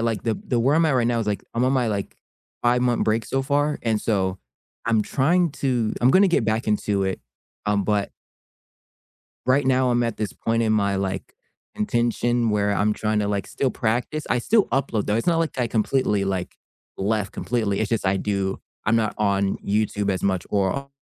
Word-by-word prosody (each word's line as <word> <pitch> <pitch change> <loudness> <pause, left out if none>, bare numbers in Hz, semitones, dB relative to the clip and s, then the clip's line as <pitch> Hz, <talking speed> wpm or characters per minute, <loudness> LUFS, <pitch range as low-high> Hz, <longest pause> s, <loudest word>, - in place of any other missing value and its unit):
like 115 -3 -1
the 115 -2 0
the 120 -2 +1
where 140 +6 +3
I'm 165 - +4
at 155 - +2
right 120 -2 +2
now 120 -1 +1
is, 115 - -2
like, 105 -1 -1
I'm 120 +2 +1
on 130 - +2
my, 125 -3 +1
like, 100 -2 -3 0.5
five-month 120 0 +2
break 110 0 +1
so 135 +4 -1
far, 145 +2 0
and 110 -2 0
so 95 -4 0 0.5
I'm 115 -2 +3
trying 165 +9 +2
to 120 -5 +1
I'm 125 +2 +5
gonna 190 +3 +5
get 150 -9 +2
back 110 +2 0
into 105 -1 0
it, 95 -1 -2 0.5
um, 105 -1 +2
but 105 -1 0 1.4
Right 130 +1 +3
now 130 -1 +3
I'm 120 0 +2
at 115 -2 -2
this 105 -2 -3
point 115 0 -1
in 110 -1 +2
my, 100 -2 +1
like, 95 -1 -3 0.4
intention 120 +1 0
where 105 -1 +1
I'm 105 +1 +2
trying 105 0 0
to, 100 - -1
like, 100 -1 -1
still 135 -2 -1
practice, 125 +7 -1
I 125 - +2
still 215 - +3
upload 120 -6 -1
though, 105 - +1
it's 115 - -2
not, 170 -2 +3
like, 165 -4 -2
I 125 - +1
completely, 110 -2 +1
like, 95 -2 -3 0.4
left 105 +1 -1
completely, 110 -5 -1
it's 110 - 0
just 110 -4 0
I 95 +1 +2
do 95 -1 -2 0.3
I'm 110 +2 +3
not 110 -2 0
on 100 -2 +1
YouTube 105 0 0
as 95 - -2
much 95 -2 0
or 100 -2 +1
o 140 0 -6
110 Hz, 205 wpm, -23 LUFS, 100-125 Hz, 1.4 s, I'm